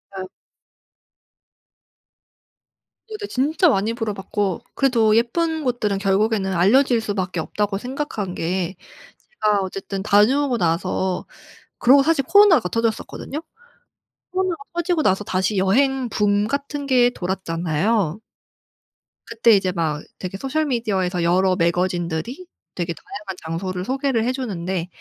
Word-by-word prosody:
아. 190 -1 -5 2.8
어 435 - -6
네 410 - -5
진짜 310 +6 +2
많이 215 -2 +1
물어봤고 205 -4 -2
그래도 230 -6 +3
예쁜 320 +7 0
곳들은 235 -6 0
결국에는 195 0 +1
알려질 230 +7 +4
수밖에 190 -5 -3
없다고 205 +4 -2
생각한 245 -6 -4
게 180 +2 -2 0.7
제가 210 -2 +3
어쨌든 195 +1 -5
다녀오고 245 +6 +3
나서 180 +1 -1 0.5
그러고 275 +3 +6
사실 290 -2 +2
코로나가 380 - +6
터졌었거든요. 230 +5 -2 0.9
코로나가 370 -4 -1
터지고 345 -1 0
나서 190 -5 +2
다시 190 +2 0
여행 255 +7 +2
붐 205 -1 +1
같은 280 +1 -3
게 245 -2 +4
돌았잖아요. 180 0 -1 1.1
그때 230 0 +3
이제 190 -3 +3
막 155 -4 -1 0.2
되게 185 +1 -5
소셜미디어에서 230 - -1
여러 185 +2 +3
매거진들이 175 - -1 0.3
되게 170 -1 -2
다양한 200 0 -8
장소를 180 +3 -4
소개를 265 -3 0
해 245 - +1
주는데 190 -9 -3
210 Hz, 290 characters per minute, -21 LUFS, 185-265 Hz, 2.8 s, 그러고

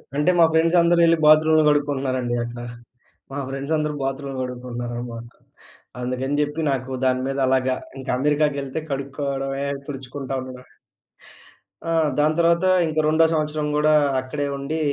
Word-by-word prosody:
అంటే‌ 150 +5 +3
మా 170 - +8
ఫ్రెండ్స్ 165 +2 +3
అందరూ 170 0 +3
యేళ్ళి 165 0 +5
బాత్రూమ్‌లు 155 +1 +6
కడుక్కుంటున్నారండి 135 -4 0
అక్కడ. 120 0 -7 0.7
మా 145 - -4
ఫ్రెండ్స్ 135 +3 -3
అందరూ 150 0 -1
బాత్రూమ్‌‌‌‌‌‌‌‌‌లు 135 0 -3
కడుకుంటున్నారనమాట. 120 -1 -6 0.8
అందుకని 130 +3 -2
జెప్పి. 150 +2 -2
నాకు 130 0 -3
దాని 130 0 +2
మీద 135 0 -3
అలాగా 130 0 +2 0.2
ఇంకా 130 - -4
అమెరికాకెళ్తే 145 -1 0
కడుక్కోవడమే, 135 0 -3 0.2
తుడుచుకుంటా 135 0 -6
ఉండడమే. 125 -1 -11 1.1
ఆ! - - -3 0.3
దాని 155 +1 +3
తర్వాత 170 +2 +3 0.2
ఇంక 155 0 -1
రెండో 160 +1 +4
సంవత్సరం 150 -1 -1
గూడా 150 +1 +3 0.3
అక్కడే 145 +3 -4
ఉండి, 150 +4 -3
140 Hz, 135 wpm, -22 LUFS, 130-155 Hz, 1.1 s, మా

